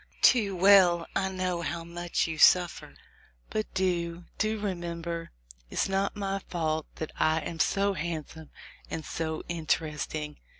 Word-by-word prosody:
Too 210 Hz, -6 st, +5 dB
well 180 Hz, -2 st, +6 dB
I 190 Hz, -1 st, +1 dB
know 185 Hz, -2 st, -2 dB
how 170 Hz, 0 st, -3 dB
much 175 Hz, +1 st, -2 dB
you 160 Hz, -1 st, -4 dB
suiter; 180 Hz, -1 st, +4 dB, 0.6 s
but 215 Hz, 0 st, -2 dB
do, 175 Hz, -2 st, 0 dB, 0.2 s
do 215 Hz, 0 st, +1 dB
remember, 170 Hz, -4 st, -4 dB, 0.4 s
it -, -, -10 dB
is -, -, +2 dB
not 195 Hz, +1 st, 0 dB
my 195 Hz, -1 st, -2 dB
fault 160 Hz, -3 st, -1 dB
that 160 Hz, -, -5 dB
I 160 Hz, 0 st, +3 dB
am 165 Hz, 0 st, -6 dB
so 200 Hz, +3 st, +2 dB
handsome 160 Hz, -2 st, -5 dB, 0.4 s
and 160 Hz, -, -4 dB
so 160 Hz, -1 st, -3 dB
interesting.' 155 Hz, -2 st, -2 dB
170 Hz, 140 wpm, -29 LUFS, 160-190 Hz, 0.6 s, well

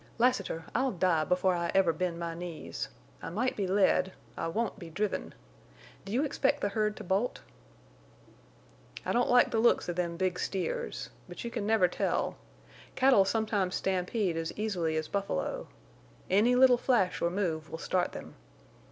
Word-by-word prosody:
"Lassiter, 240 Hz, -9 st, +1 dB
I'll 260 Hz, +3 st, +2 dB
die 170 Hz, -3 st, +2 dB
before 185 Hz, +1 st, +2 dB
I 170 Hz, -1 st, -1 dB
ever 185 Hz, -4 st, +4 dB
bend 170 Hz, +1 st, -2 dB
my 170 Hz, -1 st, -3 dB
knees. 170 Hz, -1 st, -6 dB, 0.3 s
I -, -, -5 dB
might 230 Hz, +9 st, -1 dB
be 200 Hz, -2 st, -1 dB
led: 190 Hz, -1 st, +3 dB, 0.2 s
I -, -, -2 dB
won't 220 Hz, +5 st, -2 dB
be 170 Hz, -, -8 dB
driven. 205 Hz, +5 st, -3 dB, 0.7 s
Do 195 Hz, -, -7 dB
you 250 Hz, +6 st, +2 dB
expect 275 Hz, -1 st, +1 dB
the 205 Hz, -, +1 dB
herd 210 Hz, 0 st, 0 dB
to -, -, -7 dB
bolt?" 195 Hz, +7 st, -1 dB, 1.6 s
"I -, -, 0 dB
don't 245 Hz, +1 st, +2 dB
like 245 Hz, 0 st, +5 dB
the 225 Hz, -, +1 dB
looks 235 Hz, +1 st, +3 dB
of 175 Hz, -, -3 dB
them 170 Hz, -1 st, -1 dB
big 185 Hz, -1 st, 0 dB
steers. 480 Hz, -, -3 dB, 0.2 s
But -, -, -7 dB
you 235 Hz, -, -4 dB
can 210 Hz, -3 st, -3 dB
never 215 Hz, -5 st, +4 dB
tell. 175 Hz, -, -1 dB, 0.6 s
Cattle 255 Hz, -7 st, +5 dB
sometimes 205 Hz, -3 st, 0 dB
stampede 185 Hz, -1 st, 0 dB
as 165 Hz, 0 st, -2 dB
easily 180 Hz, -7 st, -1 dB
as 155 Hz, -, -2 dB
buffalo. 200 Hz, -, -2 dB, 0.6 s
Any 220 Hz, +6 st, +4 dB
little 250 Hz, -1 st, +6 dB
flash 215 Hz, -9 st, +1 dB
or 170 Hz, -, +2 dB
move 165 Hz, -5 st, -2 dB
will 160 Hz, -, -5 dB
start 180 Hz, +2 st, 0 dB
them. -, -, -9 dB
195 Hz, 170 wpm, -30 LUFS, 175-230 Hz, 1.6 s, little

